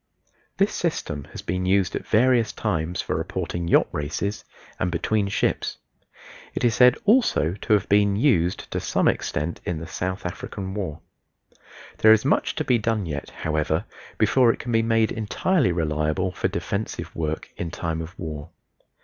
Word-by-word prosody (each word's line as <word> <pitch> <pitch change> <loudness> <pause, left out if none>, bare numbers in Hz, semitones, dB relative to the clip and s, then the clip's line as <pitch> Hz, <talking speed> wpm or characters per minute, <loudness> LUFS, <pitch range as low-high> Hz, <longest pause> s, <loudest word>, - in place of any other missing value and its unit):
This - - +2
system 75 -2 -2
has - - -9
been 90 +1 -2
used 95 -1 +2
at - - -5
various 115 0 +3
times 90 -4 -2
for - - -2
reporting 85 -1 -3
yacht - - +4
races, 75 +8 -3 0.4
and 90 - +1
between 100 +4 0
ships. 100 - -1 0.8
It - - -2
is 120 -2 +4
said 125 +1 +6
also 210 - +3
to 105 +3 -1
have 105 -1 +2
been 100 0 +4
used 100 - +2
to - - -1
some - - +1
extent 80 +3 -1
in 85 - -2
the 80 - -6
South 95 +3 -4
African 95 +2 -5
War. 90 -7 -4 1.0
There 110 0 +8
is 110 +3 +2
much 140 - +1
to 155 - -1
be 125 -5 +2
done 110 -2 0
yet, 70 -4 -5
however, 80 +4 -1 0.3
before 115 +3 +4
it - - -5
can 120 - -5
be 115 -1 +3
made 115 -1 +2
entirely 120 - +1
reliable 80 +2 0
for - - -1
defensive 105 +2 -4
work 80 -1 -3
in 85 - -3
time 80 -1 -3
of 80 +3 -9
war. 75 -2 -6
95 Hz, 165 wpm, -24 LUFS, 80-110 Hz, 1.0 s, There